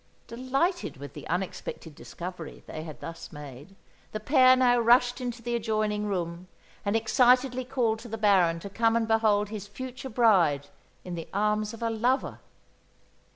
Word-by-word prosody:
Delighted 270 - -1
with 140 0 -9
the - - -9
unexpected 175 -2 -4
discovery 175 +2 -8
they 155 - -7
had 155 -2 -9
thus 165 0 -8
made, 145 +4 -11 0.4
the 215 - -2
pair 255 +2 +5
now 245 -1 +4
rushed 245 +2 +4
into 240 -1 -5
the 240 0 -1
adjoining 215 -2 -1
room 175 -2 -3 0.4
and 200 +1 0
excitedly 250 +3 +3
called 240 -4 0
to 235 - -10
the 225 0 -5
Baron 185 -6 +3
to 200 - -7
come 225 +2 +2
and 230 -1 +1
behold 215 -2 +2
his 205 -2 -6
future 255 +5 -7
bride 185 - +3 0.3
in 180 - -7
the 165 -2 -6
arms 210 +1 0
of 230 0 -8
a 230 - 0
lover. 245 +5 0
215 Hz, 160 wpm, -27 LUFS, 185-245 Hz, 0.4 s, pair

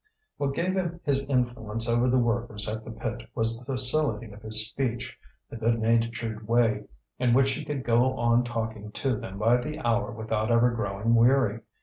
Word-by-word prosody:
What 140 -1 -2
gave 180 +2 0
him 175 -2 -2
his 135 -1 +1
influence 120 -4 -1
over 120 +2 +2
the 130 - +3
workers 115 -3 0
at 110 +1 -4
the - - -10
pit 115 +1 -5
was 115 0 +1
the 125 - -14
facility 130 -2 +3
of 100 +1 -13
his 110 0 +1
speech, 120 0 -3 0.3
the - - -9
good 115 +1 +1
natured 115 -1 -1
way 115 -3 +2 0.3
in 125 -2 +3
which 135 +1 +4
he 155 +3 -4
could 145 -3 -4
go 125 +2 +2
on 120 +1 +3
talking 110 -3 -5
to 135 -3 -1
them 95 -2 -7
by 115 +4 +3
the 150 +5 -5
hour 115 -3 0
without 110 0 -2
ever 120 +1 +4
growing 110 0 -1
weary. 115 -2 +3
115 Hz, 190 wpm, -27 LUFS, 110-125 Hz, 0.3 s, which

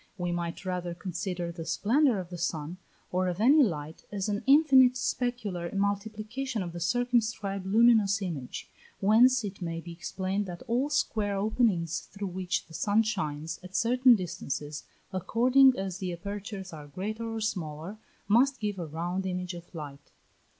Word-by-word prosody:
We 175 -2 -2
might 175 +2 -4
rather 180 -2 -3
consider 180 -1 -4
the 165 -1 -7
splendour 245 - +2
of 180 -1 -6
the 175 - -5
sun, 165 0 -3 0.3
or 185 +1 +1
of 180 +1 -2
any 275 +8 +6
light, 160 - -1
as 200 -1 -2
an 205 0 -1
infinite 270 -3 +7
specular 220 -10 -2
multiplication 215 +4 -2
of 175 - -5
the 175 - -5
circumscribed 220 -2 0
luminous 215 -2 +5
image, 160 -10 -5 0.3
whence 235 +5 +5
it 200 -1 -6
may 165 -1 -3
be 170 +1 -9
explained 190 +3 -3
that 175 +4 -7
all 255 +4 0
square 215 -8 0
openings 195 -6 +1
through 200 -1 -6
which 180 0 -2
the 160 - -17
sun 205 +6 +2
shines, 160 -7 -3
at 185 +1 -11
certain 250 +1 +5
distances, 150 -5 -4 0.3
according 250 +7 +4
as 190 -1 -4
the 185 -3 -3
apertures 200 +1 -6
are 150 -2 -9
greater 215 +9 -4
or - - -2
smaller, 180 -2 -4 0.3
must 255 +6 +4
give 205 -3 -2
a 170 - -4
round 175 +5 -3
image 180 0 -3
of 175 0 -10
light. 145 -2 -8
195 Hz, 160 wpm, -29 LUFS, 175-225 Hz, 0.3 s, infinite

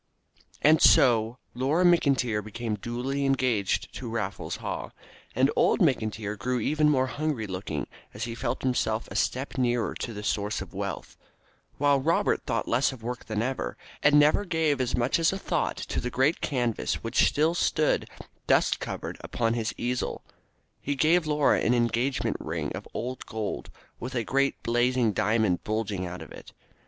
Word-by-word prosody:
And 155 +1 +6
so 115 -2 +5 0.2
Laura 140 +8 +1
McIntyre 135 -11 +3
became 110 +2 -4
duly 125 +6 -3
engaged 130 -7 0
to 125 - -6
Raffles 105 -3 -3
Haw, - - -5 0.5
and 130 +4 +3
old - - +3
McIntyre 110 - 0
grew 125 +5 -1
even 150 +6 +2
more 130 -3 +3
hungry 145 -3 -2
looking 90 -6 -4 0.3
as 105 - -6
he 115 -1 -3
felt 120 +1 -3
himself 115 -3 0
a - - -7
step 130 +1 -1
nearer 120 -2 +1
to 120 - -5
the 105 -1 -7
source 105 0 -1
of - - -8
wealth, - - -5 0.6
while 140 -1 +3
Robert 165 +5 +1
thought - - -1
less 125 +4 +2
of 125 -4 -11
work 120 0 -5
than 110 0 -1
ever, 130 +2 -3 0.2
and 150 0 +5
never 150 +7 +4
gave 160 -7 +1
as 125 -1 0
much 125 +6 +1
as 165 - +3
a 195 - -3
thought - - -1
to - - -3
the 125 - -3
great 135 +6 +1
canvas 120 -5 -1
which - - +3
still 155 +3 +2
stood, 155 -3 +1 0.4
dust - - +3
covered, - - -5
upon 115 -1 0
his 115 0 -1
easel. 125 +1 -2 0.6
Haw 145 - -1
gave 160 +3 +3
Laura 150 -1 +3
an 120 - +3
engagement 120 +3 0
ring - - -3
of - - -7
old 125 +3 -4
gold, 105 - -4 0.3
with 130 +2 -6
a 120 - 0
great 140 +4 0
blazing 120 -1 +2
diamond 105 -2 +1
bulging 105 -4 -2
out 90 -1 -7
of - - -14
it. - - -12
125 Hz, 170 wpm, -27 LUFS, 110-140 Hz, 0.6 s, And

